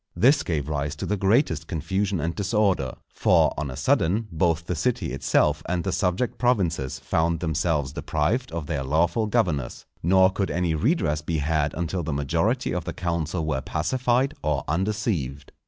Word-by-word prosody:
This 140 +4 +4
gave 75 -5 -2
rise 75 -1 -2
to - - -5
the 105 - 0
greatest 95 - +1
confusion 95 +4 -1
and 80 +3 -1
disorder; 100 - +1 0.2
for, - - +3
on 70 +1 -3
a 65 - -6
sudden, 95 +10 +1
both 85 0 +1
the 90 - -2
city 90 - -1
itself 70 0 +2
and 90 -1 0
the 95 - -1
subject 90 +7 -1
provinces 90 - +1
found 85 0 0
themselves 80 -4 0
deprived 95 +12 -1
of 80 -2 -4
their 70 -3 -2
lawful 85 - +1
governors; 75 -10 -1 0.2
nor 95 +2 +5
could 95 0 -1
any 85 -2 0
redress 80 - +1
be 80 +1 -2
had 75 0 0
until 85 +2 -2
the 80 -2 -3
majority 85 - 0
of 90 -1 -3
the 85 - -4
council 85 -1 -2
were 65 -4 -1
pacified 125 - 0
or 75 -2 0
undeceived. 85 - -2
85 Hz, 170 wpm, -25 LUFS, 75-100 Hz, 0.2 s, nor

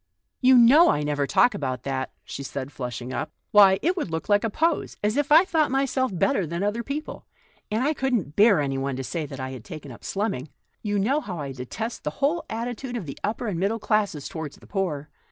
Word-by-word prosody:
" - - -54
You 255 0 +7
know 270 +9 +7
I 150 - +1
never 145 -1 0
talk 245 - +4
about 130 -8 -3
that," 130 -1 -2
she - - -7
said, 140 0 -5
flushing 125 -1 -5
up. 150 +3 -3
" - - -51
Why, 195 -2 +7
it 355 +3 +2
would 320 - -3
look 160 0 -4
like 205 0 +4
a 225 - +1
pose 325 +9 0
— - - -45
as 210 +1 +1
if 290 0 0
I 325 +5 +8
thought 320 -5 +2
myself 265 -1 0
better 195 -1 +1
than 170 +4 -3
other 210 +3 0
people. 285 +5 -6 0.4
And 220 +4 0
I 300 +3 +2
couldn't 245 - -1
bear 205 -5 +5
anyone 135 -1 -2
to 135 - -4
say 155 +2 -3
that 135 -1 -8
I 130 0 -4
had 130 - -7
l 105 - -19
taken 150 -4 -8
up 120 - -13
slumming.' 195 - -2 0.3
You 205 -1 -1
know 260 +10 +1
how 185 - -6
I 140 -3 -4
detest 135 - -5
the - - -1
whole 315 +4 +1
attitude 240 +2 -4
of 205 - -5
the 140 - -8
upper 220 +4 -2
and 195 -7 -2
middle 200 +5 +1
classes 210 -9 0
toward 160 -3 -6
the - - -17
poor. 170 -8 -2
200 Hz, 240 wpm, -25 LUFS, -, 0.4 s, I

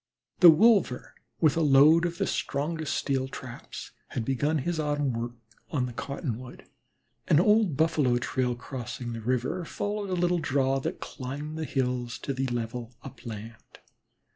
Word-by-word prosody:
The 175 - +10
wolver, 185 - +4 0.3
with 155 -4 +4
a 165 - +1
load 150 +3 +6
of 170 0 -6
the - - 0
strongest 155 +2 -2
steel 135 -2 0
traps, 130 -2 -9 0.2
had 115 - -4
begun 145 +5 +1
his 165 +4 -2
autumn 145 -3 0
work 120 +1 -3 0.4
on 130 -4 0
the 125 - -6
'Cottonwood.' 125 -2 -5 0.6
An 150 - +5
old 210 -5 +3
Buffalo 155 -6 +3
trail 125 0 -1
crossing 120 -1 -6
the 115 - -5
river 130 +9 -1
followed 205 +4 -3
a 185 - 0
little 175 0 +2
draw 135 -2 +1
that - - -4
climbed 145 +3 -6
the 160 0 -3
hills 125 -4 -1
to 140 - -4
the 130 0 -1
level 120 0 -4
upland. 115 -3 -9
135 Hz, 155 wpm, -28 LUFS, 125-160 Hz, 0.6 s, The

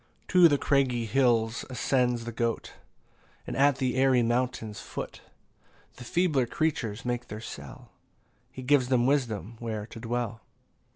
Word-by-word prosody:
14 180 -3 +7
To 145 - +3
craggy 130 -5 +1
hills 115 -1 +2
ascends 125 -2 0
the 120 - -4
goat; 115 0 -2 0.7
And - - -5
at 140 0 +4
the 130 -2 -1
airy 130 -2 +4
mountain's 115 -3 -1
foot - - -7 0.8
The - - -9
feebler 150 -2 +1
creatures 115 -8 -2
make 120 0 -2
their 105 - -7
cell; 110 - -10 0.6
He 130 - -8
gives 130 -1 +3
them 125 -2 +2
wisdom 115 - 0
where 110 -3 -4
to 115 - -11
dwell. 115 -1 -3
120 Hz, 140 wpm, -28 LUFS, 115-135 Hz, 0.8 s, 14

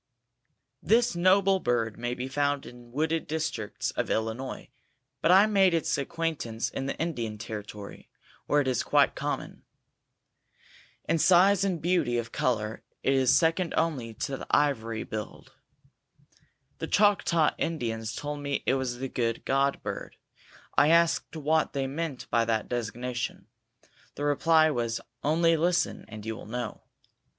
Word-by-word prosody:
This 235 -1 +3
noble 190 +2 +4
bird 115 - 0
may 120 +1 -2
be 125 +1 -4
found 145 +1 0
in 120 -1 -13
wooded 160 +4 -1
districts 155 -9 -3
of - - -2
Illinois, 115 +4 -3 0.5
but - - +2
I 190 +3 +7
made 195 -4 +4
its 165 - 0
acquaintance 140 -6 -3
in 135 - -4
the - - -3
Indian 120 -10 -3
Territory, 105 -1 -8 0.4
where 145 0 +3
it 135 - -3
is 130 -2 +1
quite - - +3
common. - - -4 1.5
In 165 - +2
size 190 +3 +5
and 185 -4 0
beauty 165 -8 +1
of 115 -1 -3
color 110 -3 -1 0.2
it 135 - +3
is 130 -1 +4
second 165 +1 +2
only 135 -9 -1
to 135 +3 -3
the - - -9
ivory 115 -6 +1
billed. 110 -1 -7 1.3
The - - -3
Choctaw 195 -6 +3
Indians 115 -8 -2
told 145 0 -4
me 140 -1 -2
it - - +3
was 130 -2 -1
the 135 +2 -3
"Good 115 -3 -2
God" 135 +1 +1
bird. - - -6 0.6
I 145 - +5
asked 170 0 +3
what 155 +1 +1
they 135 -2 -1
meant 140 0 -4
by 115 -1 +3
that 110 -1 0
designation. 120 +1 -4 0.7
The 145 - -5
reply 155 +2 +4
was 115 -3 -1 0.2
"Only 165 +3 +3
listen 175 +2 0
and 110 -1 -9
you 110 0 -3
will - - -10
know." 120 -1 -5
140 Hz, 145 wpm, -28 LUFS, 120-165 Hz, 1.5 s, I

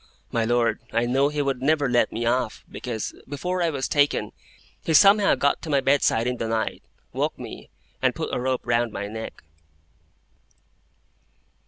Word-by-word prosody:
My 115 -1 +1
Lord, 115 -1 +1
I 115 +1 +1
knew 135 +4 +2
he 150 -1 -1
would 135 -2 -2
never 145 0 +2
let 120 -3 +2
me 115 +1 -3
off, 125 +2 0
because, 115 -4 -5 0.2
before 180 +6 -2
I 170 - +2
was 140 -4 -2
taken, 145 -1 +1 0.5
he 160 - +1
somehow 200 +2 +6
got 140 0 +1
to 165 - -7
my 140 -2 +3
bedside 135 -4 +2
in 125 0 -1
the 115 - -3
night, 110 -1 -2 0.3
woke - - -1
me, - - -9 0.3
and - - +2
put - - -4
a - - 0
rope 130 0 0
round 120 -1 +1
my 100 - -4
neck." 110 +2 -7
130 Hz, 170 wpm, -24 LUFS, 115-145 Hz, 0.5 s, somehow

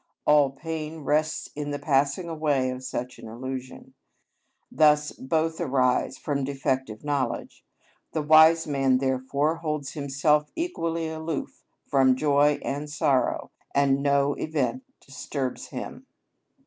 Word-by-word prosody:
All 150 -2 +5
pain 155 +2 -6
rests 155 +3 0
on 145 0 -4
the 145 - -2
passing 145 +3 +1
away 150 -5 0
of 130 0 -7
such 125 -1 -5
an - - -10
illusion; 130 +3 -7 0.8
thus 150 -1 +4
both 160 +4 -1
arise 130 -3 +1
from 140 -2 -2
defective 130 -5 -2
knowledge; 145 -2 -2 0.5
the 155 - -2
wise 160 +2 +6
man 135 -3 +2
therefore 135 +4 0
holds 150 -4 -3
himself 150 +1 +1
equally 165 - -2
aloof 160 -1 -5 0.2
from 130 -2 +4
joy 145 +1 +3
and 145 +2 -3
sorrow, 140 -3 0 0.2
and 140 -1 +3
no 140 0 +2
event 160 - -1 0.2
disturbs 135 -1 -5
his - - -5
αταραξια. - - -10
145 Hz, 125 wpm, -26 LUFS, 135-155 Hz, 0.8 s, wise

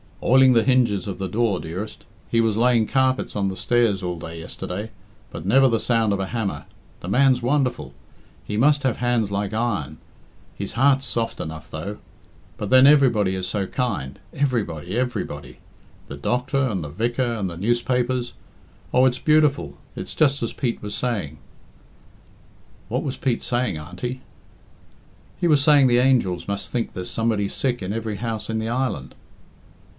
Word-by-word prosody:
"Oiling 130 0 +6
the 115 -2 +4
hinges 115 -7 +2
of 95 - -4
the 95 - -3
door, 105 -1 0
dearest. 95 +7 -7 0.2
He 115 - +3
was 110 -2 +1
laying 120 -2 +3
carpets 130 0 +1
on 100 -2 0
the 95 - -5
stairs 110 -1 +2
all 90 -2 -3
day 80 0 -7
yesterday. 90 +5 -6 0.4
But - - -7
never 135 +6 +5
the 115 -3 +1
sound 115 -3 +1
of 100 - -1
a 95 - -2
hammer. 100 -9 -3 0.4
The - - -7
man's 130 +4 +3
wonderful. 125 - 0 0.5
He 105 - -5
must 145 +4 +3
have 130 -4 +1
hands 120 -4 0
like 100 0 -2
iron. 100 -10 -2 0.6
His 100 - -4
heart's 135 +2 +3
soft 115 -1 -2
enough, 80 0 -6
though. 95 +7 -5 0.6
But 105 - -4
then 130 +3 +7
everybody 120 -10 +4
is 95 -1 -3
so 100 +1 -1
kind 95 - -3
everybody, 110 - -1
everybody! 100 - -3 0.5
The 70 - -8
doctor, 125 - 0
and 95 -8 -2
the 75 - -6
vicar, 120 - -1
and 100 -4 -2
the 85 - -8
newspapers 120 +4 0 0.6
oh, 130 +1 +5
it's 125 -1 +1
beautiful! 145 - +2 0.2
It's - - -6
just 140 -2 +3
as 115 - -2
Pete 125 -4 -2
was 105 0 -4
saying." 100 - -2 1.5
"What 125 +4 -1
was 135 -4 -4
Pete 125 -4 -1
saying, 120 -8 -1
Auntie?" 90 +12 -6 1.2
"He 175 - +2
was 150 -4 +4
saying 145 -3 +6
the 120 -1 +4
angels 120 -10 +2
must 100 0 -3
think 120 -2 -2
there's 90 -1 -5
somebody 110 -3 0
sick 125 +2 -1
in 95 +2 -3
every 110 -2 -3
house 115 -1 -4
in 110 - -1
the 110 +1 -3
island." 130 +2 -2
115 Hz, 170 wpm, -23 LUFS, 95-130 Hz, 1.5 s, then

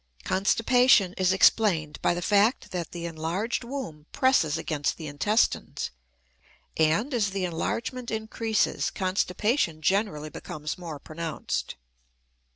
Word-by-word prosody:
Constipation 220 0 +3
is 185 -1 +2
explained 185 -5 +3
by 175 - +2
the 175 - -3
fact 210 +6 +2
that 175 -2 -3
the 170 -1 -6
enlarged 170 +9 -2
womb 235 - -6
presses 215 - +3
against 155 -3 -2
the 160 - -7
intestines; 205 +10 0 0.8
and, 165 - +2
as 215 -4 +1
the 195 -1 -2
enlargement 235 +8 -3
increases, 220 0 0
constipation 185 - 0
generally 155 -2 0
becomes 150 0 -6
more 170 -4 -7
pronounced. 160 +3 -4
185 Hz, 115 wpm, -27 LUFS, 160-220 Hz, 0.8 s, Constipation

